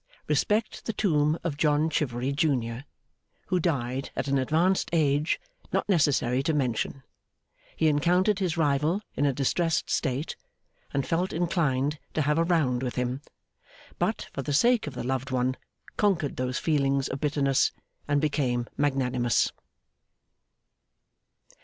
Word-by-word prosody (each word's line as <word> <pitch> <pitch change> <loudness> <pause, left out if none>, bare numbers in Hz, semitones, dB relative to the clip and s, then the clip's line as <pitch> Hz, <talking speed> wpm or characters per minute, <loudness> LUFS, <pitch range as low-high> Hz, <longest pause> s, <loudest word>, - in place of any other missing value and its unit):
RESPECT 215 +1 0
THE 225 - -2
TOMB 155 -7 +2
OF 160 -5 -2
JOHN 150 0 +2
CHIVERY, 130 -3 -1
JUNIOR, 135 -4 0 0.6
WHO 180 - +2
DIED 135 -6 -1
AT - - -2
AN 140 0 +2
ADVANCED 165 +8 +2
AGE 150 -1 +2 0.3
NOT - - 0
NECESSARY 140 -8 +2
TO 155 +3 0
MENTION. 130 0 -1 0.7
HE 160 - +2
ENCOUNTERED 180 +7 +3
HIS 175 -4 -1
RIVAL 155 +5 +1
IN 145 - +2
A 140 - +1
DISTRESSED 155 +4 0
STATE, 135 +1 -1 0.6
AND 140 -1 -1
FELT 175 +3 0
INCLINED 150 -4 0 0.2
TO 155 - +2
HAVE 150 +2 +1
A - - +4
ROUND 155 -8 +1
WITH 125 -2 -3
HIM; 125 +2 -2 0.8
BUT, - - -1
FOR 140 - -3
THE 145 +2 -3
SAKE 235 - +3
OF 140 - -6
THE - - -4
LOVED 130 +1 -2
ONE, 130 0 0 0.4
CONQUERED 190 -9 +1
THOSE 125 0 -1
FEELINGS 140 -3 +1
OF 135 - -4
BITTERNESS, 140 -2 +2 0.4
AND 145 -1 +2
BECAME 130 -5 0
MAGNANIMOUS. 125 -4 +1
145 Hz, 140 wpm, -27 LUFS, 130-165 Hz, 0.8 s, A